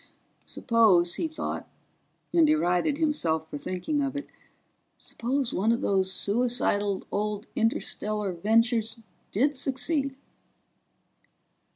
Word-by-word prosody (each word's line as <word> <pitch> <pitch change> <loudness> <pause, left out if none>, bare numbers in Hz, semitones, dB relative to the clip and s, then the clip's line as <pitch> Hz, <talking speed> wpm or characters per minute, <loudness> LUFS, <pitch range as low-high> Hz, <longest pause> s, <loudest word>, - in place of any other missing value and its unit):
Suppose, 205 -8 +3
he 325 - -1
thought 315 - -5 0.6
and 330 -2 +5
derided 280 - +2
himself 170 - 0
for 145 - -5
thinking 185 - -2
it 285 0 -2 1.3
one 215 +4 +2
of 235 - 0
those 190 -1 +1
suicidal 205 -2 +1
old 210 +1 -2
interstellar 215 -2 -1
ventures 225 +5 +1 0.3
did 280 +8 +1
succeed? 270 +2 0
225 Hz, 90 wpm, -27 LUFS, 195-275 Hz, 1.3 s, and